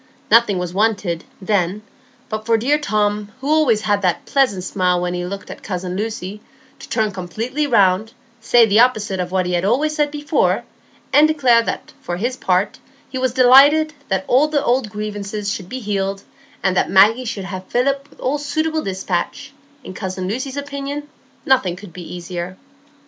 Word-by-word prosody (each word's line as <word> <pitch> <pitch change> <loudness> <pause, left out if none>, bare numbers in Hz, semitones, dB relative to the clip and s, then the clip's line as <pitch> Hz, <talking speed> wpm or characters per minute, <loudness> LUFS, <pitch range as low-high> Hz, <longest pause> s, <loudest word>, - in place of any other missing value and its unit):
Nothing 225 -3 +5
was 180 -1 -3
wanted, 200 -5 0
then, 195 0 0 0.4
but 215 0 -5
for 230 -1 +4
dear 280 +7 +1
Tom, 210 -5 -1
who 270 - -6
always 285 -9 +3
had 205 -1 +1
that 180 -3 0
pleasant 255 -10 +1
smile 180 -1 +1
when 180 0 -2
he 175 0 -3
looked 200 +2 -7
at - - -10
cousin 180 -1 -4
Lucy, 210 -1 -4 0.4
to - - -11
turn 220 -2 0
completely 225 - -3
round, 210 -2 +3 0.3
say 230 +1 +5
the 215 0 +3
opposite 215 -6 +2
of 180 0 -3
what 185 -1 +1
he 180 - -2
had 175 0 +1
always 270 +10 +1
said 295 -1 +1
before, 295 +1 0 0.5
and 300 +1 +7
declare 260 -7 +4
that - - -5
he, - - -31
for 175 - -3
his 240 +6 -2
part, 190 -2 0 0.3
was 260 -1 0
delighted 280 +5 +6
that 190 -1 -1
all 270 +5 +4
the 300 -2 0
old 245 -2 +1
grievances 210 -1 -4
should 185 -3 -7
be 260 - -5
healed, 195 -3 -2 0.4
and 190 -1 +2
that - - +1
Maggie 215 +6 +5
should 200 -4 -4
have 185 -1 -7
Philip 275 +3 0
with - - -22
all 285 +3 -1
suitable 315 +2 -1
despatch; 195 - -3 0.3
in 185 - -8
cousin 185 -1 -4
Lucy's 260 +6 -4
opinion 285 +1 -5 0.4
nothing 250 -10 +2
could 180 -2 -12
be 180 0 -8
easier. 175 +1 -6
215 Hz, 180 wpm, -19 LUFS, 185-260 Hz, 0.5 s, and